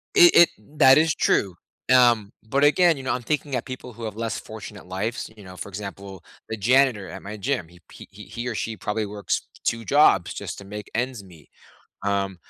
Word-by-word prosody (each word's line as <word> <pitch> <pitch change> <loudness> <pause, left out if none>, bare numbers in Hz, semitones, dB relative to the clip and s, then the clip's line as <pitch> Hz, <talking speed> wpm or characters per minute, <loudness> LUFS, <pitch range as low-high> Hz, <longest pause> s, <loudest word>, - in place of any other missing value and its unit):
It 350 -3 +8
it 170 - +8 0.3
that 135 +1 +8
is 160 0 +3
true, 95 -4 +1 0.4
um, 120 -5 +4 0.2
but, 140 +4 +1
again, 170 +2 +5
you 135 - -8
know, 130 - -1
I'm 125 - -3
thinking 145 -1 -2
at 125 - -3
people 130 -2 -8
who 115 +1 -10
have 105 -1 -5
less 115 -1 -3
fortunate 105 -3 -10
lives, 105 +7 -3
you 105 - -14
know, 90 -1 -12
for - - -6
example, 100 -2 -8 0.3
the 110 - -2
janitor 125 -1 +3
at 95 - -8
my 105 +2 -7
gym. 110 -5 -2
He 85 +1 -18
p - - -12
he 105 +2 -12
he 120 +1 -6
or 115 - -3
she 110 0 -3
probably 105 +1 -2
works 100 0 -2 0.2
2 115 0 0
jobs 140 - +4
just - - -6
to 100 - -11
make 105 +1 -8
ends 125 -2 -2
meet 85 -5 -17 0.6
um, 100 -2 -1
110 Hz, 210 wpm, -24 LUFS, 100-130 Hz, 0.6 s, It